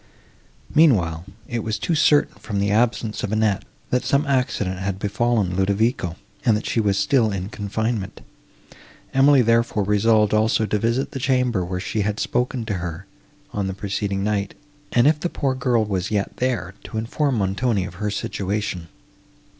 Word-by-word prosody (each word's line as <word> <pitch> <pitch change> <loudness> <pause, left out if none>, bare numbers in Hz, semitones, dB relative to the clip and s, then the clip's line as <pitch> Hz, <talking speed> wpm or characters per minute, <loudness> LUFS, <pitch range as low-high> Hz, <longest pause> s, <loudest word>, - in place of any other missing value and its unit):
Meanwhile, 90 - +3 0.2
it 120 -2 -2
was 110 -1 -2
too 170 - -1
certain, 150 -1 +4
from 105 -2 -4
the 100 0 +1
absence 115 0 +1
of 105 - -3
Annette, 110 -3 +1 0.3
that 125 - +1
some 140 +2 +2
accident 125 -9 0
had 95 0 -2
befallen 105 -1 0
Ludovico, 100 -1 +1 0.3
and 115 -4 +4
that 105 - -6
she - - 0
was 100 -2 +1
still 115 -1 +2
in 95 0 -4
confinement; 110 -2 -3 0.9
Emily, 135 -1 +5
therefore, 115 -2 +2
resolved 105 +1 +3
also 110 +1 +2
to 105 0 0
visit 115 +5 0
the 135 - -5
chamber, 125 -6 +1
where 90 +1 -3
she 105 +3 -2
had 105 +1 -1
spoken 125 -1 -1
to 105 - -2
her, 85 +1 -5 0.5
on 100 -2 -1
the 95 - -4
preceding 100 0 -2
night, 100 -1 -1 0.4
and, 120 0 +4
if 150 +1 +4
the 175 - -2
poor 135 -5 -1
girl 125 -4 +1
was 95 -3 -2
yet 100 -2 -2
there, 115 -9 -1
to 110 - -6
inform 130 +5 0
Montoni 100 +1 0
of 95 - -8
her 105 - 0
situation. 100 -3 -3
105 Hz, 170 wpm, -22 LUFS, 100-120 Hz, 0.9 s, Emily